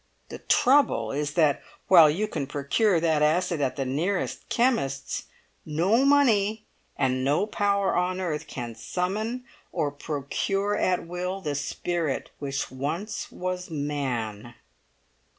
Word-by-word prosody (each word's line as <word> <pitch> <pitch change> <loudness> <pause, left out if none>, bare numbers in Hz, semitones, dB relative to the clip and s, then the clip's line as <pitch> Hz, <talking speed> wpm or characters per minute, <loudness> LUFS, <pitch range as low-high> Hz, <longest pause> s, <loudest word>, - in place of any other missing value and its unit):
The - - -7
trouble 280 +3 +3
is 145 +1 -2
that, 155 -4 +3 0.3
while 165 -5 +8
you 195 +8 0
can 150 -9 -3
procure 165 - +1
that 160 -2 +2
acid 165 +1 +2
at 135 -2 0
the 135 - -2
nearest 170 +9 -2
chemist's, 140 - 0 0.4
no 180 - +2
money 220 -7 +3 0.3
and 130 -1 +1
no 145 +8 +2
power 200 -2 +1
on 180 +1 0
earth 160 -4 -3
can 120 -5 -6
summon 210 - -3 0.3
or 145 - -1
procure 160 +8 -2
at 180 -4 +1
will 180 +2 -3
the 150 -6 -3
spirit 155 +1 -2
which 135 -2 -3
once 155 +11 -4
was 180 0 -4
man." 125 -7 -3
165 Hz, 130 wpm, -26 LUFS, 145-200 Hz, 0.4 s, while